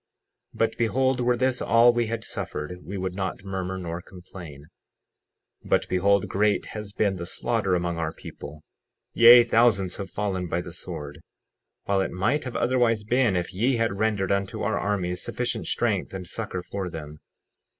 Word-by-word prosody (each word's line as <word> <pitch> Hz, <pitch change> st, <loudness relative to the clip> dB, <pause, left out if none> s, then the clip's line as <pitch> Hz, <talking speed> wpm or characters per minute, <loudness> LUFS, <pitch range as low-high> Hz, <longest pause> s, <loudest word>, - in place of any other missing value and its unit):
60:4 -, -, -13 dB
But 115 Hz, -, +1 dB
behold, 130 Hz, +2 st, +2 dB
were 120 Hz, 0 st, +2 dB
this 130 Hz, 0 st, +1 dB
all 120 Hz, +1 st, +5 dB
we 120 Hz, -1 st, 0 dB
had 115 Hz, 0 st, -3 dB
suffered 90 Hz, +4 st, -5 dB
we 100 Hz, +2 st, -6 dB
would 95 Hz, -1 st, -3 dB
not 95 Hz, 0 st, -4 dB
murmur 95 Hz, -1 st, -4 dB
nor 85 Hz, -1 st, -5 dB
complain. 90 Hz, -6 st, -11 dB, 1.0 s
60:5 -, -, -13 dB
But -, -, +2 dB
behold, 100 Hz, +2 st, +2 dB
great 105 Hz, +1 st, +1 dB
has 105 Hz, -2 st, -6 dB
been 100 Hz, -2 st, 0 dB
the 85 Hz, 0 st, -5 dB
slaughter 105 Hz, -2 st, 0 dB
among 85 Hz, -1 st, -1 dB
our 80 Hz, -1 st, -1 dB
people; 75 Hz, -1 st, -10 dB, 0.5 s
yea, 120 Hz, +1 st, +9 dB
thousands 115 Hz, -5 st, +2 dB
have 100 Hz, -2 st, -5 dB
fallen 95 Hz, -1 st, -2 dB
by 85 Hz, +1 st, -1 dB
the 85 Hz, -, -9 dB
sword, 80 Hz, -4 st, -7 dB, 0.6 s
while 100 Hz, -1 st, +1 dB
it -, -, -1 dB
might 115 Hz, +12 st, 0 dB
have 125 Hz, -, -5 dB
otherwise 120 Hz, -4 st, +2 dB
been 120 Hz, -2 st, +2 dB
if 90 Hz, +1 st, -2 dB
ye 120 Hz, +8 st, +1 dB
had 115 Hz, -4 st, -1 dB
rendered 105 Hz, -4 st, +1 dB
unto 100 Hz, -1 st, -1 dB
our -, -, 0 dB
armies 95 Hz, -3 st, -1 dB
sufficient -, -, -2 dB
strength -, -, 0 dB
and 95 Hz, -1 st, -5 dB
succor 90 Hz, -1 st, -5 dB
for 95 Hz, -1 st, -4 dB
them. 75 Hz, -2 st, -8 dB
100 Hz, 175 wpm, -25 LUFS, 90-115 Hz, 1.0 s, yea